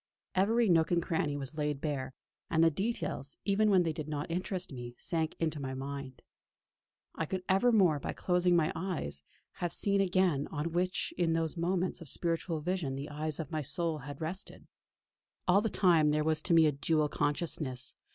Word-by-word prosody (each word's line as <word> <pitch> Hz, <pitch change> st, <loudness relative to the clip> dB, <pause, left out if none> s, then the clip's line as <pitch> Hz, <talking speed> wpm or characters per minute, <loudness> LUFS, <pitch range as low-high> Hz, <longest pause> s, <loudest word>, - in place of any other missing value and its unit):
Every 225 Hz, +5 st, +3 dB
nook 165 Hz, -3 st, +4 dB
and 175 Hz, -, +3 dB
cranny 150 Hz, -4 st, -1 dB
was 145 Hz, +3 st, -5 dB
laid 150 Hz, -2 st, -1 dB
bare; 140 Hz, -3 st, -3 dB, 0.4 s
and 165 Hz, 0 st, +3 dB
the 165 Hz, -, +5 dB
details, 175 Hz, -, -3 dB
even 210 Hz, +2 st, +3 dB
when 190 Hz, -3 st, +5 dB
they 165 Hz, -2 st, -1 dB
did 155 Hz, -1 st, -5 dB
not 150 Hz, +2 st, -3 dB
interest 180 Hz, -1 st, -3 dB
me, 120 Hz, -1 st, -7 dB
sank 160 Hz, -3 st, -2 dB
into 160 Hz, -2 st, -1 dB
my 130 Hz, -1 st, -4 dB
mind. 135 Hz, -1 st, -6 dB, 0.9 s
I 165 Hz, -, -3 dB
could 185 Hz, +1 st, -3 dB
evermore, 190 Hz, -6 st, +4 dB
by -, -, -3 dB
closing 180 Hz, -1 st, +2 dB
my 165 Hz, -2 st, +3 dB
eyes, 160 Hz, -, -3 dB, 0.4 s
have 175 Hz, -1 st, -2 dB
seen 200 Hz, -1 st, +3 dB
again 180 Hz, -6 st, +2 dB
anything 160 Hz, -, -6 dB
on 160 Hz, +3 st, -1 dB
which 180 Hz, +2 st, -1 dB
in 165 Hz, -2 st, +2 dB
those 165 Hz, 0 st, -1 dB
moments 180 Hz, +1 st, -1 dB
of 160 Hz, -, -5 dB
spiritual 165 Hz, 0 st, -1 dB
vision 165 Hz, -5 st, -1 dB
the 140 Hz, +2 st, -5 dB
eyes 155 Hz, +1 st, -3 dB
of 160 Hz, -2 st, -5 dB
my 155 Hz, -1 st, -1 dB
soul 165 Hz, +2 st, -2 dB
had 140 Hz, +1 st, -8 dB
rested. 175 Hz, +5 st, -5 dB, 0.8 s
All 190 Hz, +3 st, +5 dB
the 225 Hz, -, 0 dB
time 170 Hz, -6 st, +4 dB
there 150 Hz, 0 st, +2 dB
was 155 Hz, 0 st, +2 dB
to 170 Hz, -, +1 dB
me 165 Hz, -1 st, +7 dB
a 150 Hz, -, +4 dB
dual 150 Hz, +2 st, +1 dB
consciousness. 145 Hz, -3 st, -1 dB
160 Hz, 190 wpm, -32 LUFS, 150-180 Hz, 0.9 s, me